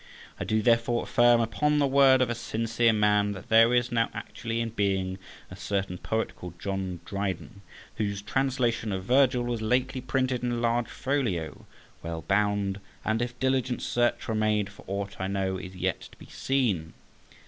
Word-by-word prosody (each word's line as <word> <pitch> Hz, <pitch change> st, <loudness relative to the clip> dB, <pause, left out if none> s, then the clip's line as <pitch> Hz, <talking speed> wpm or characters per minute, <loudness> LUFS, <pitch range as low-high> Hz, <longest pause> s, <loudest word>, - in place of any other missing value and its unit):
I -, -, -3 dB
do 110 Hz, 0 st, +1 dB
therefore 120 Hz, 0 st, +2 dB
affirm, 120 Hz, 0 st, +4 dB
upon 150 Hz, +6 st, +1 dB
the 145 Hz, -, +3 dB
word 135 Hz, -1 st, +5 dB
of 125 Hz, -, -2 dB
a -, -, +1 dB
sincere 115 Hz, 0 st, +1 dB
man, 105 Hz, -1 st, +2 dB
that 95 Hz, +1 st, -10 dB
there 115 Hz, +1 st, +6 dB
is 125 Hz, +1 st, +2 dB
now 115 Hz, -1 st, +1 dB
actually 115 Hz, -1 st, -4 dB
in 115 Hz, 0 st, -1 dB
being 95 Hz, -3 st, -1 dB, 0.3 s
a -, -, -7 dB
certain 95 Hz, -3 st, -3 dB
poet 110 Hz, 0 st, -2 dB
called 85 Hz, -1 st, -10 dB
John 95 Hz, -3 st, -3 dB
Dryden, 100 Hz, +1 st, -4 dB, 0.4 s
whose 100 Hz, -1 st, -2 dB
translation 125 Hz, -3 st, 0 dB
of 95 Hz, -1 st, -3 dB
Virgil 125 Hz, +2 st, +3 dB
was 120 Hz, -2 st, -2 dB
lately 130 Hz, +4 st, 0 dB
printed 130 Hz, 0 st, 0 dB
in 120 Hz, -1 st, -1 dB
large 120 Hz, 0 st, +1 dB
folio, 120 Hz, -, -2 dB, 0.3 s
well 85 Hz, -1 st, -5 dB
bound, 100 Hz, +2 st, +1 dB, 0.3 s
and 110 Hz, +1 st, +1 dB
if 120 Hz, 0 st, -4 dB
diligent 130 Hz, -1 st, 0 dB
search 120 Hz, 0 st, 0 dB
were 115 Hz, -, -1 dB
made, 105 Hz, -2 st, +1 dB
for 100 Hz, -, -15 dB
aught 100 Hz, 0 st, -4 dB
I 95 Hz, -, -1 dB
know, 95 Hz, -1 st, -1 dB
is 95 Hz, 0 st, -9 dB
yet 90 Hz, -, -1 dB
to -, -, -18 dB
be -, -, -13 dB
seen. 105 Hz, -12 st, -1 dB
115 Hz, 175 wpm, -27 LUFS, 100-120 Hz, 0.4 s, there